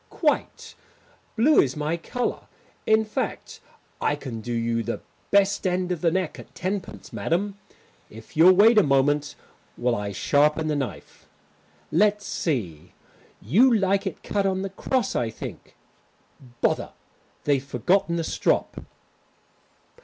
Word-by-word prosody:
"Quite 300 -3 -1 0.6
blue 280 +7 +5
is 130 -1 -1
my 150 +2 -1
colour. 240 +9 -4 0.4
In 220 0 +4
fact, 215 - -4 0.4
I 145 - +1
can 125 -6 -7
do 120 - -6
you 115 0 0
the 115 +1 -4 0.3
best 200 -1 +3
end 180 0 -1
of 175 - -2
the 170 - +3
neck 185 -1 -2
at - - -13
tenpence, 190 +1 -5
madam, 200 +4 -1 0.5
if 110 +1 -14
you'll 175 +4 +7
wait 215 +3 +7
a - - +7
moment 145 0 +1 0.4
while 125 0 0
I 105 -1 -3
sharpen 150 - +2
the 150 - 0
knife. 135 -3 -6 0.6
Let's 205 +4 +2
see; 100 - -3 0.5
you 210 - +5
like 200 -2 +2
it - - -6
cut 200 -1 0
on 190 0 -1
the 195 - -4
cross, 250 +3 -1
I 115 - 0
think? - - -9 0.9
Bother, - - 0 0.5
they've 140 -2 +1
forgotten 170 - +1
the 165 - -1
strop." - - 0
170 Hz, 140 wpm, -25 LUFS, 135-200 Hz, 0.9 s, you'll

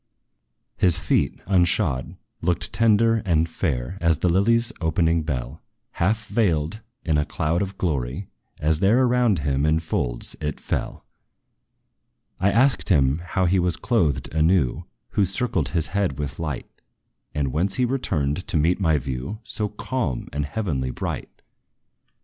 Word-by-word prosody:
His 90 -2 +3
feet, - - 0
unshod, 85 -7 +1 0.2
looked 90 0 0
tender 115 0 +3
and 85 -4 +2
fair, 80 0 -2
As 85 -2 +3
the 90 - +1
lily's 115 +6 +3
opening 80 0 +2
bell, 70 -2 -4 0.3
Half 110 +5 0
veiled 90 -3 0 0.2
in 80 -3 +2
a - - +2
cloud 80 +4 -1
of 100 0 -4
glory, 75 +1 -2 0.3
as 75 +1 +1
there 110 +7 +4
Around 120 -6 +3
him, 70 -1 +1
in 80 +1 +3
folds, - - -2
it 75 0 -3
fell. - - -4 1.3
I 95 - +3
asked 125 +5 +2
him 70 -4 +3
how 90 +2 -1
he 95 +2 +3
was 90 -2 +1
clothed 75 - 0
anew 80 -4 +2 0.3
Who 105 - +2
circled 95 - 0
his 80 -2 -1
head 100 -9 0
with 75 -1 -4
light 75 -6 -5 0.5
And 70 -2 0
whence 90 +8 +1
he 125 - +2
returned 90 - -1
to - - 0
meet 85 +5 +2
my 80 -5 +3
view 65 +6 -4
So 105 -2 -2
calm 105 - -3
and 75 +1 -2
heavenly 75 -7 -2
bright. - - -5
85 Hz, 145 wpm, -24 LUFS, 75-100 Hz, 1.3 s, there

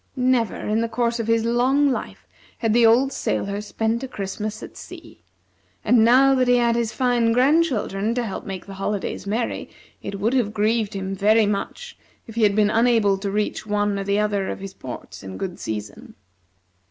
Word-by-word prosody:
Never, 250 -3 +1
in 215 +2 -1
the 230 - -1
course 235 0 -1
of 225 - -2
his 230 0 +2
long 260 +4 +2
life, - - -5 0.3
had 225 -2 0
the 235 -1 +5
old 260 +4 +3
sailor 200 +1 -2
spent 225 +2 -2
a 265 - -4
Christmas 215 0 -5
at - - -10
sea; - - -12 0.6
and 240 -3 +5
now 260 +4 +6
that 255 -1 +2
he 245 0 +5
had 235 -1 +2
his 235 -1 -1
fine 240 -3 +1
grandchildren 250 -6 +1
to 245 - 0
help 195 - -5
make 190 -3 -7
the 195 - -9
holidays 195 0 -3
merry, 225 +4 -2 0.3
it 200 - -6
would 220 +5 0
have 225 -5 0
grieved 215 0 0
him 195 0 -3
very 215 +3 +4
much 210 - -4 0.3
if 225 - -11
he 230 - -2
had 205 -2 +4
been 210 -1 +3
unable 225 -3 +3
to 200 0 -3
reach 210 +1 -2
one 205 -1 0
or - - -2
the 200 +1 0
other 205 -2 0
of - - -4
his 195 0 -8
ports 110 - -9
in 95 -1 -8
good 185 -2 -5
season. 105 -2 -6
220 Hz, 195 wpm, -22 LUFS, 200-240 Hz, 0.6 s, now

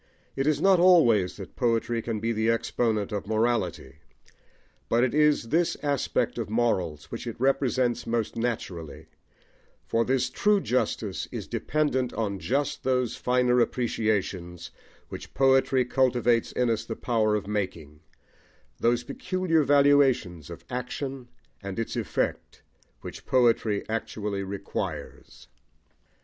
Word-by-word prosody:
It 135 +1 -1
is 155 - +2
not 190 -2 +4
always 120 - +4
that 95 -3 -10
poetry 115 -1 0
can 115 -1 -3
be 115 +2 -1
the 110 0 0
exponent 115 -2 0
of 105 -1 -4
morality; 110 - -1 0.9
but 120 +1 +3
it 130 - +1
is 150 -6 +3
this 165 +5 +1
aspect 140 -4 0
of 110 -3 -4
morals 95 -10 -1
which - - -6
it - - -6
represents 130 -2 +1
most 115 -1 -1
naturally, 100 -9 -4 0.8
for 115 - +1
this 130 +1 0
true 210 -1 +2
justice 115 - -2
is - - -5
dependent 145 -5 -1
on 100 -3 -2
just 135 - -1
those 125 -2 0
finer 125 0 +2
appreciations 100 -8 -1 0.4
which - - -9
poetry 135 -1 +3
cultivates 125 -2 +2
in 125 -2 +1
us 115 - -1
the 115 - -5
power 110 -3 +1
of 105 - -2
making, 90 -8 -4 0.8
those 120 +1 +2
peculiar 165 +4 0
valuations 140 - +3
of - - -10
action 125 +1 -5 0.3
and 100 -1 -6
its 115 - -3
effect - - -3 0.4
which - - -9
poetry 115 -5 +2
actually 105 -2 -3
requires. 100 0 -6
120 Hz, 130 wpm, -26 LUFS, 105-130 Hz, 0.9 s, not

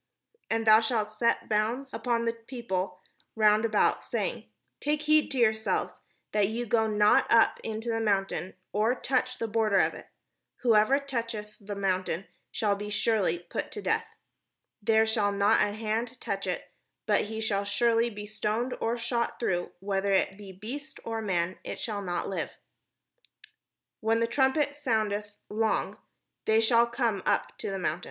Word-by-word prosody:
And 225 0 0
thou 215 0 +8
shalt 220 -2 0
set 235 +2 +1
bounds 230 +5 0
unto 235 -2 0
the 230 - +1
people 225 -6 -4 0.3
round 215 0 +4
about, 215 -2 +2
saying, - - -3
' - - -51
Take 300 +1 0
heed 305 0 +4
to 270 - -3
yourselves, 220 -2 +1 0.3
that 210 -2 +3
ye 230 +3 -3
go 220 0 +2
not 210 -1 +4
up 230 -1 +5
into 225 +1 -4
the 225 0 0
mount, 195 -3 +1 0.4
or 220 +4 +2
touch 255 -1 -1
the 230 - -2
border 215 -2 +2
of - - +3
it: - - -11 0.5
whosoever 230 +2 +5
toucheth 230 -6 -4
the 205 0 -6
mount 190 -2 0 0.4
shall 205 -2 +1
be 205 +1 -6
surely 210 -4 +1
put - - -4
to - - -5
death: - - 0 0.7
there 220 +1 +4
shall 220 -2 +1
not 200 +2 +3
an 205 0 +1
hand 220 +2 -2
touch - - -3
it, - - -4 0.3
but - - +2
he 220 +1 -5
shall 205 -3 0
surely 230 +3 +2
be 210 -2 -7
stoned, 215 +4 -2
or 230 +1 0
shot 235 0 -2
through; 175 -6 -1
whether 195 0 0
it 190 - +1
be 200 -1 -10
beast 245 +11 -8
or 225 -1 -3
man, 185 -3 -1
it - - -6
shall 210 -3 -3
not 175 -3 -2
live 195 - -2 0.8
': - - -29
when 225 +1 +2
the 230 - +3
trumpet 270 +4 +1
soundeth 215 -6 -1
long, 220 +1 -1 0.5
they 220 0 +4
shall 230 +1 +4
come 235 -5 0
up - - +1
to - - -3
the 195 - -2
mount." 170 -3 -1
220 Hz, 170 wpm, -28 LUFS, 205-235 Hz, 0.8 s, thou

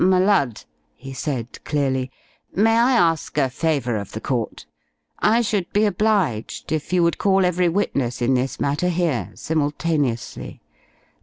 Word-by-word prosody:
"M' 180 - +5
Lud," 185 - +2 0.3
he 135 0 -9
said 130 -3 -4
clearly, 130 -3 -1 0.5
"may 225 +3 +4
I 240 +3 +4
ask 165 - +1
a 135 -3 +2
favour 135 -6 0
of 100 -2 -7
the 110 - -4
court? 120 -1 -3 0.5
I 225 +3 +3
should 205 -6 -1
be 210 +1 +3
obliged 200 - 0
if 155 +1 -2
you 180 -1 +3
would 170 - +1
call 195 -2 +3
every 180 0 +2
witness 140 -9 -1
in 125 +2 +2
this 130 +1 -1
matter 145 +6 0
here 170 -7 0
simultaneously. 145 -5 -2
160 Hz, 150 wpm, -22 LUFS, 130-185 Hz, 0.5 s, M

